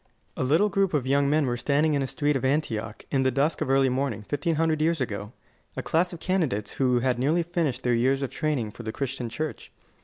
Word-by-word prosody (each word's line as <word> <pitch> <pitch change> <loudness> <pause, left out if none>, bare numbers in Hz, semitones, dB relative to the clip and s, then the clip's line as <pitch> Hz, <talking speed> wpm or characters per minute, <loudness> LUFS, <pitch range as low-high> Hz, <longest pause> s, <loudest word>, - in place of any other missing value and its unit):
A - - -2
little 160 +11 +3
group 195 -4 +1
of 135 -4 0
young 140 +1 +2
men 150 0 +3
were 120 -2 0
standing 145 +5 +1
in 140 - +1
a 135 - -1
street 145 +2 0
of 135 - -1
Antioch, 115 -6 -1
in 135 - +2
the 130 - +3
dusk 140 +5 0
of - - -1
early 135 0 +4
morning, 130 -3 -1
fifteen 145 +7 -1
hundred 160 -1 +1
years 165 +1 +2
ago 105 -4 -3 0.5
a - - -2
class 175 +3 +1
of 175 - -8
candidates 155 - -1
who 125 -2 +2
had 125 -1 +1
nearly 155 +7 +2
finished 165 -7 -2
their 125 - +2
years 130 +4 +2
of 135 - -3
training 140 -9 -1
for 120 - -10
the 110 -1 -4
Christian 130 -1 -4
church. 155 +5 -5
140 Hz, 235 wpm, -26 LUFS, 125-155 Hz, 0.5 s, early